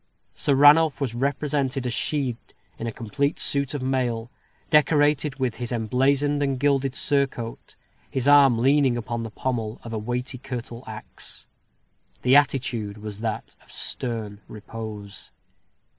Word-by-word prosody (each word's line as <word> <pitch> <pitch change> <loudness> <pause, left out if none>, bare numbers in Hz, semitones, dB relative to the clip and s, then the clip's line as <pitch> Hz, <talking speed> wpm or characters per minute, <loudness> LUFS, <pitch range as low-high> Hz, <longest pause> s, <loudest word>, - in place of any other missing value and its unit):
Sir 140 - +1
Ranulph 145 +2 +6
was 135 -5 -2
represented 135 0 -1
as 125 - -1
sheathed 130 -3 -2 0.2
in 115 - -3
a - - -2
complete 140 +6 -2
suit 140 0 0
of 135 - -3
mail, 125 -3 -1 0.4
decorated 150 -2 +3
with 130 -4 -1
his 120 -1 -5
emblazoned 135 +5 +1
and 135 -2 0
gilded 135 -1 +1
surcoat, 135 -5 -1 0.3
his 130 0 -2
arm 140 -4 +7
leaning 135 0 +3
upon 120 0 -3
the 115 - -5
pommel 115 -1 -3
of 115 - -7
a 110 - -2
weighty 125 +3 -4
curtal 125 -2 -6
axe. 110 -1 -10 0.8
The 125 +2 +5
attitude 120 -7 +1
was 105 -1 -7
that 110 -1 -4
of - - -19
stern 110 -4 -3
repose. 105 -1 -8
130 Hz, 140 wpm, -24 LUFS, 115-140 Hz, 0.8 s, arm